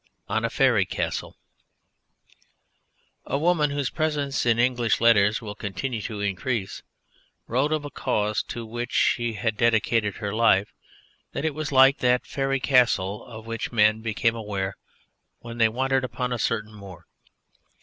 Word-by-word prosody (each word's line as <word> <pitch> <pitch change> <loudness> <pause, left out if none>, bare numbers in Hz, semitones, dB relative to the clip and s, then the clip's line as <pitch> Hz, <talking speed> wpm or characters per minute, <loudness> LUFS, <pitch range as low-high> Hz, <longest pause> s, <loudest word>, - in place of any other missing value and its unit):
ON - - -1
A - - 0
FAERY - - +3
CASTLE - - -4 1.9
A - - 0
woman 155 -1 +2
whose 140 -2 -2
presence 145 -5 -1
in 115 -1 +3
English 120 -4 +1
letters 110 -2 +4
will 105 -2 -6
continue 110 +3 -4
to 105 0 -5
increase 100 +1 -2 0.6
wrote 130 +6 0
of 155 -1 -1
a 145 - -7
cause 105 -3 -1
to 120 -1 -7
which 120 +2 -5
she 120 -1 +1
had 110 +1 -2
dedicated 115 -2 +2
her 105 -2 -4
life 110 -3 +3 0.6
that - - -3
it 155 - 0
was 155 0 -4
like 135 +1 +6
that 125 0 +2
Faery 135 0 -1
Castle 120 -7 +2
of 110 -2 -10
which 115 -1 -4
men 110 -1 +3
became 115 +1 0
aware 100 -3 -4 0.6
when 120 0 -9
they 115 -1 +5
wandered 130 +3 0
upon 125 0 -3
a 120 - -3
certain 110 -1 -2
moor. 95 -4 -12
115 Hz, 150 wpm, -25 LUFS, 105-130 Hz, 1.9 s, like